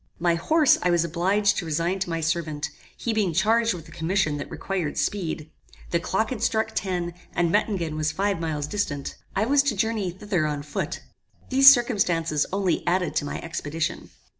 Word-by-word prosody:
My 175 Hz, 0 st, +2 dB
horse 300 Hz, -, +3 dB
I 180 Hz, -, +2 dB
was 170 Hz, -1 st, +3 dB
obliged 190 Hz, +5 st, +1 dB
to 180 Hz, -, -2 dB
resign 170 Hz, +5 st, 0 dB
to 190 Hz, -, -2 dB
my 165 Hz, -1 st, -2 dB
servant, 155 Hz, -2 st, -2 dB, 0.3 s
he 230 Hz, -, -2 dB
being 205 Hz, -6 st, +1 dB
charged 225 Hz, +5 st, +2 dB
with 165 Hz, -2 st, -10 dB
a -, -, -14 dB
commission 165 Hz, -2 st, 0 dB
that 145 Hz, -, -6 dB
required 180 Hz, -6 st, -3 dB
speed. 160 Hz, -6 st, -2 dB, 0.4 s
The 170 Hz, -, +2 dB
clock 195 Hz, +7 st, -1 dB
had 235 Hz, -5 st, -4 dB
struck 220 Hz, -1 st, +1 dB
ten, 175 Hz, -3 st, -2 dB, 0.2 s
and 170 Hz, -1 st, +2 dB
Mettingen 190 Hz, -6 st, 0 dB
was 155 Hz, 0 st, 0 dB
five 200 Hz, -2 st, 0 dB
miles 155 Hz, -3 st, -2 dB
distant. 145 Hz, -6 st, -3 dB, 0.2 s
I 200 Hz, +3 st, +2 dB
was 280 Hz, +3 st, +4 dB
to 275 Hz, -5 st, 0 dB
Journey 215 Hz, -2 st, 0 dB
thither 180 Hz, -3 st, -1 dB
on 145 Hz, -1 st, -3 dB
foot. 145 Hz, -, -4 dB, 0.5 s
These 270 Hz, +1 st, +9 dB
circumstances 180 Hz, -, +2 dB
only 195 Hz, -1 st, 0 dB
added 180 Hz, 0 st, +1 dB
to 145 Hz, -, 0 dB
my -, -, -4 dB
expedition. 160 Hz, 0 st, -4 dB
175 Hz, 185 wpm, -25 LUFS, 160-205 Hz, 0.5 s, These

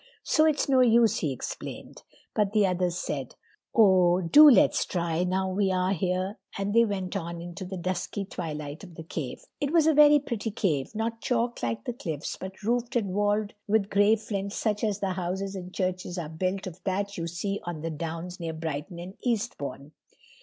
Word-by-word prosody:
"So 310 Hz, -, +3 dB
it's 300 Hz, -2 st, +1 dB
no 265 Hz, -2 st, +4 dB
use," 230 Hz, -3 st, +5 dB
he 150 Hz, -, -1 dB
explained. 130 Hz, -, -7 dB, 0.3 s
But 210 Hz, -1 st, +1 dB
the 210 Hz, -2 st, +4 dB
others 180 Hz, -1 st, 0 dB
said, 135 Hz, -7 st, -4 dB, 0.4 s
"Oh, 185 Hz, -5 st, +5 dB
do 295 Hz, -, +8 dB
let's 260 Hz, -, +5 dB
try, 170 Hz, -1 st, -1 dB
now 190 Hz, +1 st, 0 dB
we 195 Hz, 0 st, +1 dB
are 185 Hz, +1 st, +1 dB
here," 185 Hz, +2 st, -1 dB, 0.2 s
and 200 Hz, +1 st, -2 dB
they 230 Hz, +1 st, +6 dB
went 195 Hz, -3 st, -3 dB
on 170 Hz, -2 st, -4 dB
into 175 Hz, +3 st, -7 dB
the 190 Hz, +1 st, -6 dB
dusky 185 Hz, +3 st, -3 dB
twilight 150 Hz, -4 st, -6 dB
of 175 Hz, -4 st, -12 dB
the 160 Hz, -, -8 dB
cave. 155 Hz, -5 st, -5 dB, 0.2 s
It 285 Hz, -, 0 dB
was 330 Hz, -2 st, +4 dB
a 320 Hz, -, +5 dB
very 295 Hz, 0 st, +7 dB
pretty 235 Hz, -6 st, -3 dB
cave, 180 Hz, -6 st, -1 dB
not 225 Hz, +1 st, -2 dB
chalk, 240 Hz, -1 st, -1 dB
like 115 Hz, -1 st, -2 dB
the -, -, -2 dB
cliffs, 160 Hz, -, -4 dB
but 190 Hz, +2 st, -9 dB
roofed 240 Hz, +2 st, 0 dB
and 200 Hz, -6 st, 0 dB
walled 205 Hz, +1 st, +1 dB
with 210 Hz, -1 st, +1 dB
gray 205 Hz, +2 st, +5 dB
flints 200 Hz, -2 st, -4 dB
such 210 Hz, -1 st, -1 dB
as 210 Hz, -2 st, 0 dB
the 195 Hz, -2 st, 0 dB
houses 190 Hz, +2 st, -3 dB
and 180 Hz, -1 st, -7 dB
churches 185 Hz, -1 st, -2 dB
are 165 Hz, -4 st, -4 dB
built 185 Hz, +4 st, -2 dB
of 185 Hz, -1 st, -9 dB
that 200 Hz, +1 st, -2 dB
you 165 Hz, -1 st, -3 dB
see 195 Hz, +4 st, -3 dB
on 170 Hz, -3 st, -5 dB
the 165 Hz, +1 st, -3 dB
downs 165 Hz, +3 st, -5 dB
near 165 Hz, -1 st, -4 dB
Brighton 160 Hz, +2 st, -5 dB
and 175 Hz, +2 st, -7 dB
Eastbourne. 200 Hz, -, -3 dB
190 Hz, 195 wpm, -27 LUFS, 170-215 Hz, 0.4 s, do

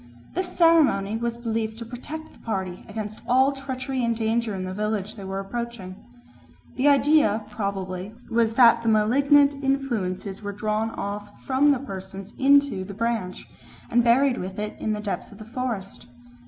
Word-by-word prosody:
This 370 Hz, 0 st, -1 dB
ceremony 305 Hz, -, +4 dB
was 235 Hz, +1 st, -2 dB
believed 225 Hz, -2 st, -2 dB
to 230 Hz, -, -7 dB
protect 300 Hz, +7 st, -8 dB
the -, -, -20 dB
party 190 Hz, -5 st, -4 dB
against 215 Hz, 0 st, -6 dB
all 260 Hz, +3 st, +4 dB
treachery 265 Hz, -1 st, -4 dB
and 235 Hz, 0 st, +1 dB
danger 225 Hz, -1 st, 0 dB
in 185 Hz, -, -4 dB
the 185 Hz, -, -4 dB
village 210 Hz, 0 st, -2 dB
they 200 Hz, -, -10 dB
were 195 Hz, 0 st, -4 dB
approaching. 205 Hz, -2 st, -5 dB, 0.8 s
The 265 Hz, +3 st, +2 dB
idea 280 Hz, -7 st, +4 dB
probably 195 Hz, -1 st, -4 dB
was 230 Hz, -1 st, +1 dB
that 235 Hz, -1 st, +6 dB
the 230 Hz, -, +1 dB
malignant 280 Hz, +6 st, +4 dB
influences 220 Hz, -8 st, -1 dB
were 205 Hz, -1 st, -4 dB
drawn 215 Hz, +2 st, -1 dB
off 205 Hz, -1 st, -6 dB
from 270 Hz, +2 st, +3 dB
the 280 Hz, -, +3 dB
persons 195 Hz, -5 st, -8 dB
into 280 Hz, -7 st, +4 dB
the 200 Hz, +1 st, -8 dB
branch 225 Hz, -4 st, -2 dB, 0.4 s
and 240 Hz, +1 st, +4 dB
buried 245 Hz, +2 st, +4 dB
with 190 Hz, +1 st, -6 dB
it 210 Hz, 0 st, -4 dB
in 215 Hz, -, -1 dB
the 210 Hz, -, -3 dB
depths 205 Hz, -2 st, -4 dB
of 200 Hz, -, -13 dB
the 215 Hz, -, -10 dB
forest. 230 Hz, -5 st, -5 dB
225 Hz, 165 wpm, -25 LUFS, 200-260 Hz, 0.8 s, that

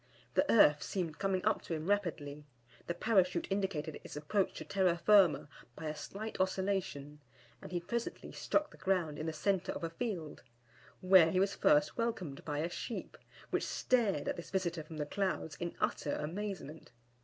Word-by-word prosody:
The 290 Hz, -, +3 dB
earth 150 Hz, -9 st, +6 dB
seemed 170 Hz, -5 st, -3 dB
coming 195 Hz, -1 st, 0 dB
up 215 Hz, -, +2 dB
to 165 Hz, -, -3 dB
him 155 Hz, 0 st, -5 dB
rapidly; 160 Hz, -8 st, -1 dB, 0.4 s
the 170 Hz, -, -2 dB
Parachute 185 Hz, -3 st, +2 dB
indicated 190 Hz, -6 st, -2 dB
its -, -, -9 dB
approach 170 Hz, +7 st, 0 dB
to -, -, -5 dB
terra, 185 Hz, 0 st, +2 dB
firma 195 Hz, -4 st, +5 dB, 0.3 s
by 160 Hz, -, -7 dB
a 155 Hz, 0 st, -2 dB
slight 210 Hz, +8 st, -6 dB
oscillation, 185 Hz, -6 st, -1 dB, 0.4 s
and -, -, -9 dB
he 175 Hz, -, 0 dB
presently 235 Hz, +7 st, -4 dB
struck 300 Hz, 0 st, 0 dB
the -, -, -15 dB
ground 175 Hz, -6 st, 0 dB
in 155 Hz, -, -3 dB
the -, -, 0 dB
centre 185 Hz, +4 st, 0 dB
of -, -, -6 dB
a 165 Hz, -, -2 dB
field, 170 Hz, -6 st, -4 dB, 0.6 s
where 185 Hz, -3 st, +7 dB
he 185 Hz, -, +1 dB
was 195 Hz, +1 st, +2 dB
first 150 Hz, +5 st, +3 dB
welcomed 195 Hz, -12 st, -2 dB
by 145 Hz, -2 st, -3 dB
a 165 Hz, -, 0 dB
sheep, 230 Hz, -, -5 dB, 0.4 s
which -, -, +1 dB
stared 215 Hz, -, +1 dB
at -, -, -1 dB
this 170 Hz, -, -8 dB
visitor 175 Hz, -3 st, -1 dB
from 155 Hz, +1 st, -9 dB
the 150 Hz, -, -1 dB
clouds 185 Hz, -3 st, -2 dB
in 175 Hz, -1 st, -4 dB
utter 145 Hz, -, 0 dB
amazement. 170 Hz, -1 st, -5 dB
180 Hz, 180 wpm, -34 LUFS, 155-195 Hz, 0.6 s, where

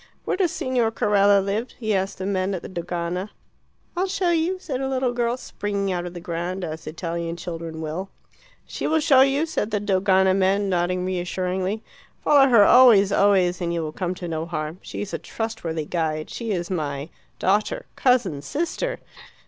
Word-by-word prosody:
"Where -, -, 0 dB
does 370 Hz, -4 st, +1 dB
Signor 250 Hz, -3 st, 0 dB
Carella 205 Hz, -3 st, +3 dB
live?" 215 Hz, +5 st, -1 dB
he 220 Hz, -3 st, -1 dB
asked 195 Hz, 0 st, -1 dB
the 185 Hz, -, -4 dB
men 190 Hz, 0 st, 0 dB
at 175 Hz, -, -6 dB
the -, -, -6 dB
Dogana. 175 Hz, +2 st, -3 dB, 0.7 s
"I'll 370 Hz, +2 st, 0 dB
show 370 Hz, -2 st, 0 dB
you," 340 Hz, +3 st, +1 dB
said 275 Hz, -8 st, -4 dB
a 265 Hz, -, -1 dB
little 260 Hz, -2 st, 0 dB
girl, 240 Hz, 0 st, 0 dB
springing 200 Hz, -5 st, -3 dB
out 175 Hz, -1 st, -2 dB
of 175 Hz, -, -9 dB
the -, -, -5 dB
ground 175 Hz, +2 st, -4 dB
as 160 Hz, -2 st, -6 dB
Italian 170 Hz, +1 st, -4 dB
children 165 Hz, -2 st, -6 dB
will. 165 Hz, +5 st, -4 dB, 0.6 s
"She -, -, -4 dB
will 320 Hz, +1 st, +2 dB
show 275 Hz, -3 st, +5 dB
you," 275 Hz, +3 st, +3 dB
said 270 Hz, -10 st, -2 dB
the 210 Hz, -2 st, 0 dB
Dogana 190 Hz, -1 st, +3 dB
men, 195 Hz, +1 st, +2 dB
nodding 180 Hz, 0 st, 0 dB
reassuringly. 185 Hz, +3 st, -2 dB, 0.4 s
"Follow 275 Hz, -2 st, +6 dB
her 230 Hz, -4 st, +7 dB
always, 225 Hz, -6 st, +7 dB
always, 190 Hz, -3 st, +3 dB
and 170 Hz, -1 st, -1 dB
you 170 Hz, -1 st, -1 dB
will 155 Hz, -, -4 dB
come 180 Hz, +2 st, -3 dB
to 175 Hz, -1 st, -6 dB
no 160 Hz, 0 st, -3 dB
harm. 155 Hz, +1 st, -4 dB
She -, -, -5 dB
is 205 Hz, -, -8 dB
a -, -, -2 dB
trustworthy 200 Hz, -9 st, -4 dB
guide. 155 Hz, -2 st, -2 dB
She 230 Hz, -2 st, -5 dB
is 180 Hz, -3 st, -2 dB
my 145 Hz, -3 st, -3 dB, 0.3 s
daughter." 215 Hz, -, 0 dB
cousin." 230 Hz, -, +2 dB
sister." 340 Hz, -, -2 dB
190 Hz, 185 wpm, -23 LUFS, 175-235 Hz, 0.7 s, her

